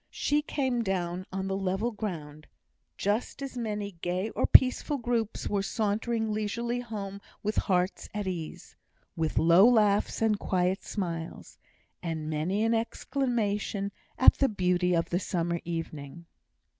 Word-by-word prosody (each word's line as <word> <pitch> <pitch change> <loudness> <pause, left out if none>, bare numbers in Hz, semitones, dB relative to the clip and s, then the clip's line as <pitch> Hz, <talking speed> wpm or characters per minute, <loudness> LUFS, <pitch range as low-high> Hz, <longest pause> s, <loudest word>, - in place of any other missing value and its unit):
She 295 +1 +1
came 260 -5 -1
down 185 -3 -2
on 190 0 -3
the 195 - -1
level 195 +4 -1
ground, 155 -9 -6 0.5
just 210 +7 -1
as 270 -2 -6
many 210 -4 -3
gay 185 +5 -1
or - - 0
peaceful 260 +3 +6
groups 235 -3 -1
were 200 -1 0
sauntering 220 +2 -1
leisurely 235 +3 -2
home 200 -4 -6 0.2
with 210 +1 -1
hearts 180 -1 0
at 210 0 -3
ease; 175 -4 -6 0.4
with 160 -1 -1
low 170 +7 +7
laughs 210 -4 +3
and 220 -2 +2
quiet 185 +1 0
smiles, 170 -5 -5 0.4
and 160 -2 -3
many 175 +8 0
an 225 +1 +2
exclamation 225 -4 -1 0.3
at 260 - +8
the 275 - +4
beauty 180 -2 +1
of 165 - 0
the 175 - +2
summer 170 -2 -1
evening. 165 -1 -5
200 Hz, 140 wpm, -29 LUFS, 175-225 Hz, 0.5 s, at